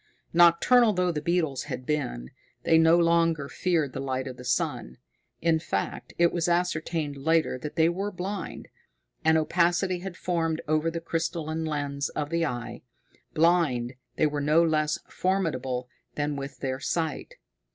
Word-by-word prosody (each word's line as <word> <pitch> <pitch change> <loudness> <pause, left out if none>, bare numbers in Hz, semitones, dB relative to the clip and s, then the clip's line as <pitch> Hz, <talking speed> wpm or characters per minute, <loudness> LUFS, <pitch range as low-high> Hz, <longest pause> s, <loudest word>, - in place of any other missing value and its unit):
Nocturnal 175 +8 +5
though 180 -1 +1
the 150 -3 -3
beetles 160 -5 0
had 130 - -6
been, 65 - -2 0.3
they 160 - +5
no 165 +1 +6
longer 165 -3 +2
feared 160 -5 0
the - - -4
light 130 -1 -2
of 130 -1 -6
the 125 - -10
sun. 65 - -2 0.5
In 165 -1 +3
fact, 125 - -3
it 170 0 +3
was 170 -1 0
ascertained 165 -4 -1
later 155 -2 +1
that 150 +3 -6
they 160 0 +4
were 190 +4 -1
blind. 190 +2 -5 0.6
An 160 0 +4
opacity 175 +3 +1
had 185 -1 -7
formed 165 -3 -1
over 155 +1 +1
the 165 0 -4
crystalline 165 -1 -2
lens 140 -2 -2
of 150 0 -4
the 165 -1 +1
eye. 120 -2 -5 0.5
Blind, 155 -7 +2 0.2
they - - +2
were 145 -1 -1
no 155 +3 +4
less 155 -2 +1
formidable 135 -10 -1 0.3
than 145 0 -1
with 140 0 -7
their 130 -1 -2
sight. 160 +2 -3
160 Hz, 155 wpm, -27 LUFS, 140-170 Hz, 0.6 s, no